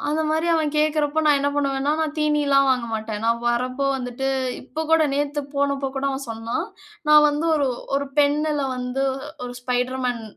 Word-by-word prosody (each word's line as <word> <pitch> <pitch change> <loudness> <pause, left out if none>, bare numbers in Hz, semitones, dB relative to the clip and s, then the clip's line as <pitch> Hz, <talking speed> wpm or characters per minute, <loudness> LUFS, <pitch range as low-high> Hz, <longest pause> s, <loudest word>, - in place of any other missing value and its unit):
அந்த 315 +1 0
மாரி 320 +2 0
அவன் 310 -2 +1
கேட்கறப்போ, 305 0 +1
நான் 295 -2 +5
என்ன 285 - +1
பண்ணுவேன்னா, 280 0 0
நான் 310 -1 -1
தீனில்லாம் 295 -2 +3
வாங்க 250 -2 +1
மாட்டேன். 215 -1 -4
நான் 230 0 +2
வர்றப்போ 255 +3 0
வந்துட்டு 250 +1 -4 0.4
இப்ப 310 +4 -5
கூட 325 0 +5
நேத்து 290 +1 -1
போனபோ 280 -1 0
கூட 270 - -2
அவன் 270 0 -4
சொன்னான். 230 - -3 0.4
நான் 300 0 +8
வந்து 295 +3 -1
ஒரு 290 -3 +1 0.3
ஒரு 280 0 -1
பென்னுல 295 +1 +1
வந்து 250 +2 -2 0.4
ஒரு 245 - -6
ஸ்பைடர் 250 +1 -1
மேன் 240 -2 -2
280 Hz, 175 wpm, -23 LUFS, 250-300 Hz, 0.4 s, நான்